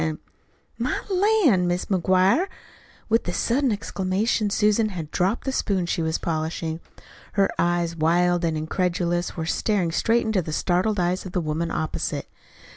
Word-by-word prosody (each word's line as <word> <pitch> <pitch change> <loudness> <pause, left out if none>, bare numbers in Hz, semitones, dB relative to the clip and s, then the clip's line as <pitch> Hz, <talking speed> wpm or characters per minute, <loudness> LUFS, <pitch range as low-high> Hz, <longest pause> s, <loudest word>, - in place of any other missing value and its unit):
An' 155 -1 -1 0.3
" - - -38 0.3
"My - - 0
lan', 365 - +3
Mis' 175 +1 -1
McGuire!" 190 - +3 0.6
With 225 +1 +2
the 175 - -2
sudden 255 +5 +1
exclamation 205 +1 0
Susan 210 +2 +2
had 165 -6 -6
dropped 190 +6 0
the 265 - -1
spoon 195 -8 0
she 170 - -1
was 160 0 0
polishing. 160 0 -3 0.5
Her 195 -1 +2
eyes, 175 -1 +1
wild 175 +2 +2
and 160 -2 0
incredulous, 175 +2 -1
were 160 - -2
staring 185 0 0
straight 230 +7 +2
into 220 -4 +1
the 155 -2 -5
startled 185 +5 +1
eyes 180 +2 0
of 185 - -10
the 185 - +1
woman 165 +1 -2
opposite. 155 0 -3
180 Hz, 160 wpm, -24 LUFS, 170-210 Hz, 0.6 s, lan